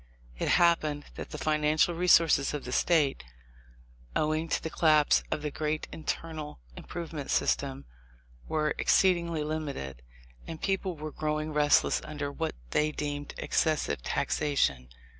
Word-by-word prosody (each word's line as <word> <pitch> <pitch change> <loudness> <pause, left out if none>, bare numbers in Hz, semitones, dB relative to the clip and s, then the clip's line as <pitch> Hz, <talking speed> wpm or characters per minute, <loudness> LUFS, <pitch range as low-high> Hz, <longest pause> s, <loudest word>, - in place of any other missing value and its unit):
It - - -1
happened 155 -4 +3
that - - -7
the - - -6
financial 155 +2 +2
resources 165 -4 +4
of 145 - -5
the 125 - -5
State, 145 - +2 0.9
owing 155 +2 0
to - - +1
the 160 - -4
collapse 155 -2 +4
of 150 - -2
the 150 - -2
great 155 +1 -2
inter 165 +1 -4
nal 150 - -7 0.2
improvement 160 -4 -6
system, 70 0 0 0.6
were 155 -1 0
exceedingly 170 -4 +3
limited, 140 - -4 0.5
and 165 -1 -6
people 190 -2 -1
were 155 +1 -6
growing 155 +1 -2
restless 145 -1 +3
under 145 -2 -4
what 140 - -3 0.2
they 155 0 +2
deemed 145 -1 -4
excessive 150 - 0
taxation. 65 - 0
155 Hz, 135 wpm, -29 LUFS, 145-160 Hz, 0.9 s, resources